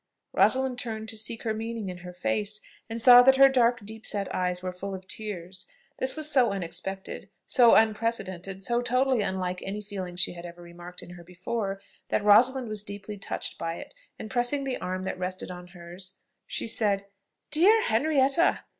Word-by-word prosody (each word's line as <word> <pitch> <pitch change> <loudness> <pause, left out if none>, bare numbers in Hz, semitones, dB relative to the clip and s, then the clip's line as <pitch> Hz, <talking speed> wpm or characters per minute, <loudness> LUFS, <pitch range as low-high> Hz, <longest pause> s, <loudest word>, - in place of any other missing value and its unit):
Rosalind 260 -1 +2
turned 220 -2 -4
to - - -3
seek 220 +1 -5
her 220 -2 0
meaning 225 -1 -4
in 180 -1 -7
her 180 0 -9
face, 205 +4 -1 0.3
and 225 +1 -3
saw 245 +1 +9
that 265 +1 +6
her 275 0 +8
dark 240 -3 +2
deep 220 +1 -9
set 200 -2 -3
eyes 180 0 -1
were 185 - -2
full 190 +2 -6
of 185 0 -11
tears. 190 -4 -6 0.3
This 260 0 -1
was 310 -1 -1
so 260 -5 +5
unexpected, 190 +1 -5 0.2
so 240 -3 +6
unprecedented, 195 -4 0
so 240 +4 +1
totally 255 0 +2
unlike 185 -2 -2
any 200 +2 -4
feeling 190 -3 -6
she 180 - +1
had 170 -1 -10
ever 175 0 -10
remarked 175 +1 -9
in - - -12
her 175 -1 -11
before, 195 +3 -4 0.3
that 215 - 0
Rosalind 245 +5 +5
was 215 -1 -3
deeply 205 0 -8
touched - - -4
by 165 0 -3
it, - - -10 0.2
and, 215 - -8
pressing 250 +3 +1
the 265 -2 -3
arm 185 +1 -3
that 190 - -4
rested 185 0 -4
on 180 0 -9
hers, 180 +1 -9 0.3
she - - -2
said: 205 -3 +2 0.5
"Dear 400 +9 +5
Henrietta! 280 +7 +2
210 Hz, 185 wpm, -27 LUFS, 185-240 Hz, 0.5 s, saw